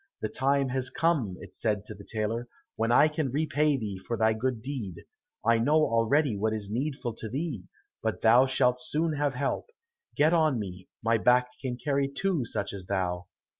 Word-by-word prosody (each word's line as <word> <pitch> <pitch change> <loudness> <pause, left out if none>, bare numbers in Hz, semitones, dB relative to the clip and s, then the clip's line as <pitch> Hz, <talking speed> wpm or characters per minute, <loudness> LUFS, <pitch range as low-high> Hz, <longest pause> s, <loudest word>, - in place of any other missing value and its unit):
"The - - 0
time 135 0 +1
has 130 0 -1
come," 140 - 0
it - - -11
said 105 -2 -1
to 110 - -7
the 100 0 -12
tailor, 110 +3 -2 0.3
"when 115 +1 0
I 145 +5 +6
can 150 -2 -1
repay 150 +1 +1
thee 105 -6 -4
for 115 +5 -4
thy 110 +1 +3
good 115 0 -2
deed. 125 -10 -4 0.5
I 115 0 +4
know 145 +7 +3
already 130 -1 +3
what 110 +2 0
is 105 -2 -5
needful 130 0 -2
to 110 0 -6
thee, 135 - -3 0.4
but - - -2
thou 120 +4 +6
shalt 125 -1 +2
soon 155 +5 0
have 145 -3 0
help; 140 +2 -2 0.5
get 155 +3 +4
on 155 -6 +3
me, 95 -3 -6
my 115 0 +3
back 125 +2 +4
can 125 -2 -3
carry 140 +1 0
two 160 0 -1
such 100 -3 -3
as 95 -2 -8
thou." 90 -3 -1
125 Hz, 190 wpm, -28 LUFS, 110-140 Hz, 0.5 s, I